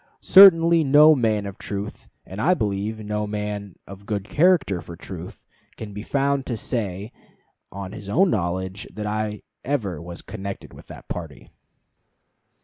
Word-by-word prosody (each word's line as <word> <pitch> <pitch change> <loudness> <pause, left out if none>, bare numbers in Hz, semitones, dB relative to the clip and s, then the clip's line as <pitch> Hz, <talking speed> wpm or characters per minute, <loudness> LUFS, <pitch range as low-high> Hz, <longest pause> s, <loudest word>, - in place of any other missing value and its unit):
Certainly 170 -4 +7
no 150 +2 +7
man 110 -6 0
of 100 -1 -8
truth, 100 +1 -6 0.2
and 95 +3 -7
I 180 +7 +3
believe 105 - -2
no 105 0 -2
man 105 -2 -5
of 100 +1 -12
good 105 -1 -3
character 155 - +2
for 85 - -10
truth, 90 0 -10 0.3
can 105 -2 -8
be 105 - -6
found 140 +3 -1
to 120 - -2
say 105 -2 -4 0.6
on 100 -1 -7
his 100 -2 -9
own 185 - +3
knowledge 95 +1 -3
that 105 - -6
I 105 0 -3 0.2
ever 105 - -2
was 85 +1 -9
connected 100 0 -7
with - - -14
that - - -12
party." 75 -7 -8
105 Hz, 150 wpm, -23 LUFS, 95-130 Hz, 0.6 s, Certainly